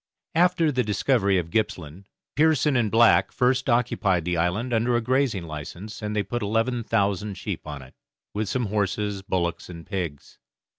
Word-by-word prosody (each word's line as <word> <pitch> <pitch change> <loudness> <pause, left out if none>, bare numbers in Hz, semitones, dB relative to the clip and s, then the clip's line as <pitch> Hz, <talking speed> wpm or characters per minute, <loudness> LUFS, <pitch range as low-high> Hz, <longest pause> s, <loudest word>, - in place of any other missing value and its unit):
After 170 -2 +3
the 130 -2 +1
discovery 105 -1 +2
of 85 -2 -3
Gippsland, 95 -4 -2 0.3
Pearson 150 -2 +3
and 120 -4 +2
Black 105 -4 +5
first 130 +2 +1
occupied 105 -7 +1
the 90 0 0
island 90 +9 0
under 120 +2 +2
a - - +3
grazing 125 -5 +1
license, 85 +7 -8
and 105 0 -3
they 105 - +1
put 120 +5 -4
eleven 115 +3 0
thousand 100 -2 0
sheep - - -5
on 75 -3 -6
it, 65 - -16 0.4
with 105 -1 -2
some 125 -2 0
horses, 105 -1 -1
bullocks, 85 -3 -2
and 85 -2 -9
pigs. 85 -7 -5
105 Hz, 165 wpm, -25 LUFS, 90-120 Hz, 0.4 s, Black